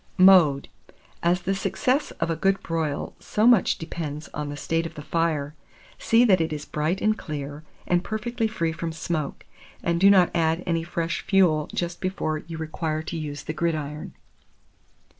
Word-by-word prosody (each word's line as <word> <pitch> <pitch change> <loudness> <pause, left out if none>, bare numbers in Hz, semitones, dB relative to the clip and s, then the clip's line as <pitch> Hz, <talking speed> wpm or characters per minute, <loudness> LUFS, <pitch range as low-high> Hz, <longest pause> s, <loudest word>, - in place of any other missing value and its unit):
Mode. 180 -7 +6 0.5
As 175 +1 +1
the 195 - 0
success 255 +8 0
of 165 +1 0
a - - 0
good 195 +4 +1
broil 160 -3 -2
so 215 - 0
much 235 -6 +5
depends 155 -2 -6
on 150 -1 -5
the 145 - -6
state 165 +2 -1
of 165 - -14
the 150 - -8
fire, 155 -3 -1 0.5
see 230 +2 +4
that 190 -6 +4
it 160 - -1
is 150 -1 -4
bright 155 +5 -1
and 215 0 +3
clear, 145 -3 -6 0.2
and 175 0 +1
perfectly 220 +2 -2
free 170 -7 -1
from 165 0 -4
smoke, 155 -2 -3 0.4
and 170 0 +1
do 195 - +8
not 185 -3 +5
add 165 +1 +1
any 165 -1 0
fresh 170 0 -2
fuel 175 -6 +3
just 175 0 -3
before 170 -5 -1
you 165 +1 -8
require 160 0 -3
to 170 - -5
use 145 -3 -5
the 155 - -4
gridiron. 155 -2 -3
165 Hz, 175 wpm, -25 LUFS, 155-185 Hz, 0.5 s, do